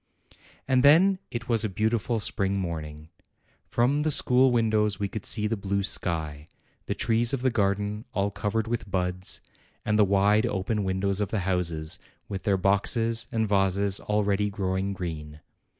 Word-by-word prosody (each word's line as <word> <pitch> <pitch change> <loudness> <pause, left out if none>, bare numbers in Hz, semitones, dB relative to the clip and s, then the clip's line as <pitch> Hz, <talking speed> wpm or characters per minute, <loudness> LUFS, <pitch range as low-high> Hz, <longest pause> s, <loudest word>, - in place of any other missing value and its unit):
And 130 -1 +3
then 175 +8 +5
it 120 0 -6
was 115 -2 +1
a 110 - -1
beautiful 110 +3 -1
spring 100 -2 0
morning. 80 -4 -5 0.6
From 130 +5 +1
the 155 - +1
school 130 -2 +4
windows 110 -4 +1
we 100 - -1
could 110 +2 -4
see 105 -2 +1
the 110 +2 0
blue 100 -1 -2
sky, 80 -5 -2 0.4
the - - -2
trees 115 +1 +2
of 125 - -7
the 130 - +2
garden 105 0 -1
all 100 0 -1
covered 105 +3 -2
with 115 -3 -3
buds, 90 0 -2 0.4
and 105 +1 +1
the - - +7
wide 100 +2 +3
open 100 +2 -2
windows 95 +1 -1
of 105 - -1
the 110 - -1
houses, 85 -4 -1 0.3
with 95 -2 -6
their 100 -2 +2
boxes 115 +5 +1
and 110 -1 0
vases 100 0 +1
already 105 -1 0
growing 95 -1 -2
green. 75 -5 -6
100 Hz, 165 wpm, -26 LUFS, 95-115 Hz, 0.6 s, the